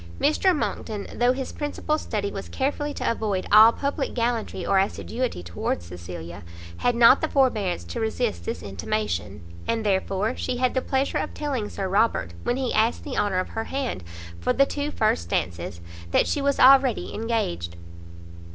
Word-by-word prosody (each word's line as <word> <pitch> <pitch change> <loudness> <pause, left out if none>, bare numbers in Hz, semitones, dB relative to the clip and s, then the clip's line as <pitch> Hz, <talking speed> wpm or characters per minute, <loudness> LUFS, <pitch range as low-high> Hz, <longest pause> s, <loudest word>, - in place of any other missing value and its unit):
Mr 310 +4 +3
Monckton, 215 -7 -3
though 245 +1 +3
his 260 0 -3
principal 300 +1 -2
study 200 -6 -3
was 195 - -6
carefully 290 +2 -1
to - - -1
avoid 210 -5 -2
all 220 +2 +9
public 280 +2 -3
gallantry 230 -6 -1
or 195 - +3
assiduity 225 - -2
towards 85 0 -3
Cecilia, 85 -1 -8 0.4
had 245 -1 +1
not 235 +3 +7
the 315 - +1
forbearance 220 - +1
to 85 0 -6
resist 100 -5 -1
this 85 0 -4
intimation, 100 -1 -3 0.2
and 225 -1 -1
therefore 195 +3 0
she 250 -1 -2
had 255 0 +1
the 260 - +1
pleasure 270 +1 0
of - - -4
telling 265 -8 -2
Sir 195 - -3
Robert, 190 - +1
when 245 - -1
he 260 -2 -1
asked 220 +2 +2
the 285 - -5
honour 200 -3 +1
of 185 - -1
her 225 - -4
hand 265 - -3 0.4
for 85 - +1
the 275 - +4
two 290 +1 -3
first 215 - 0
dances, 85 0 -2 0.3
that - - +3
she 290 - -1
was 280 0 +1
already 265 -2 +5
engaged. 85 - -2
220 Hz, 170 wpm, -25 LUFS, -, 0.4 s, all